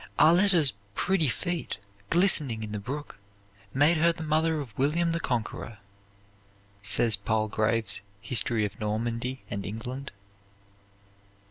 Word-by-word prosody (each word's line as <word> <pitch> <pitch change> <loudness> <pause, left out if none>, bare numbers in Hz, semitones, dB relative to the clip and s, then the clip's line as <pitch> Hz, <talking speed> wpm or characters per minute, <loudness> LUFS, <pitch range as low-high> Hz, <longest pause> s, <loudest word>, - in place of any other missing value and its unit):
"Arletta's 170 -3 +5 0.2
pretty 190 -6 +2
feet, 175 - -3 0.3
glistening 155 - +4
in 105 - -6
the 105 - -3
brook, 140 +7 -7 0.5
made 145 +7 +3
her 170 +2 +4
the 165 -1 -6
mother 160 +1 +1
of 125 -8 -8
William 165 +7 +1
the 165 - -1
Conqueror," 115 -5 -3 1.0
says 105 +2 +3
Palgrave's 110 +1 0 0.2
"History 110 0 +1
of 100 0 -7
Normandy 115 +4 -3
and 100 -1 -3
England." 125 +7 -6
125 Hz, 115 wpm, -27 LUFS, 110-160 Hz, 1.0 s, Arletta's